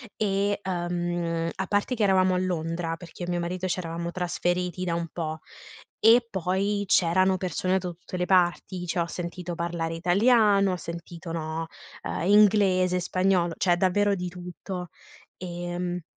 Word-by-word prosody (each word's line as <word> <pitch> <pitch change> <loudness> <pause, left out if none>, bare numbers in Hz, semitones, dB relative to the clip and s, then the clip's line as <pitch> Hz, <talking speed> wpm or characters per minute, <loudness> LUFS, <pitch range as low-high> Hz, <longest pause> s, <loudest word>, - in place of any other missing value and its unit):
e, 200 0 0
ehm, 175 -2 -2
a 190 - -4
parte 205 +5 0
che 215 - 0
eravamo 185 -1 +4
a - - +1
Londra, 165 -2 -2
perché 175 +1 -12
io - - -4
e - - -2
mio 175 - 0
marito 180 +2 -3
ci 185 - -1
eravamo 170 0 -4
trasferiti 180 0 -1
da 170 -1 0
un 170 0 -2
po' 160 -2 -4 0.7
e 235 +2 +7
poi 195 +2 0
c'erano 185 +2 +3
persone 185 +1 0
da 180 - -5
tutte 175 +1 -8
le 180 - 0
parti, 180 0 +1
cioè 175 +1 -2
ho 170 - +1
sentito 175 0 -5
parlare 170 -1 -2
italiano, 200 +2 +4
ho - - 0
sentito 170 0 -7
no, 160 0 -3 0.3
ehm, 175 - -3
inglese, 195 -3 +4
spagnolo, 185 -1 +1
cioè 175 -2 +2
davvero 200 +2 +2
di 180 -1 -4
tutto, 180 0 -7 0.5
ehm 175 0 -4
180 Hz, 160 wpm, -26 LUFS, 170-190 Hz, 0.7 s, e